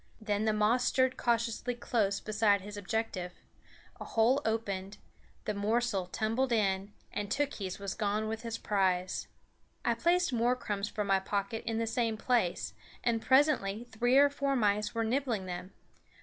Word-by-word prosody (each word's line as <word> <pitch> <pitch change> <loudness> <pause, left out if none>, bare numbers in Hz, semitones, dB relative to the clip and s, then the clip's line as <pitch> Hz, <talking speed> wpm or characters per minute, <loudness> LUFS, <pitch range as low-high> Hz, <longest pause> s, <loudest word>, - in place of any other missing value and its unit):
Then 215 -1 -1
the 220 - +3
moss 215 +4 +3
stirred 260 0 +2
cautiously 235 +1 0
close 210 -5 0
beside 210 -2 +2
his 205 +2 -8
objective; 205 -3 -3 0.7
a - - -5
hole 240 +5 +2
opened; 200 -3 -2 0.5
the 210 - -1
morsel 210 -2 0
tumbled 225 +7 0
in, 200 -3 +1 0.2
and 205 -1 -3
Tookhees 210 -8 -2
was 200 -1 -4
gone 210 0 -1
with 220 0 -3
his 230 -1 -4
prize. 185 -3 0 0.6
I 235 - +3
placed 345 +5 +2
more 240 +1 +2
crumbs 205 -4 -3
from 210 - -2
my 195 -1 +3
pocket 200 +3 -2
in 225 -1 0
the 230 - 0
same 225 -1 0
place, 230 -6 0 0.3
and 230 -2 +1
presently 260 -6 +3
three 245 +3 +3
or 285 0 +6
four 280 -1 0
mice 210 -2 +1
were 230 - +1
nibbling 235 -4 0
them. 180 +1 -6
220 Hz, 160 wpm, -31 LUFS, 200-240 Hz, 0.7 s, or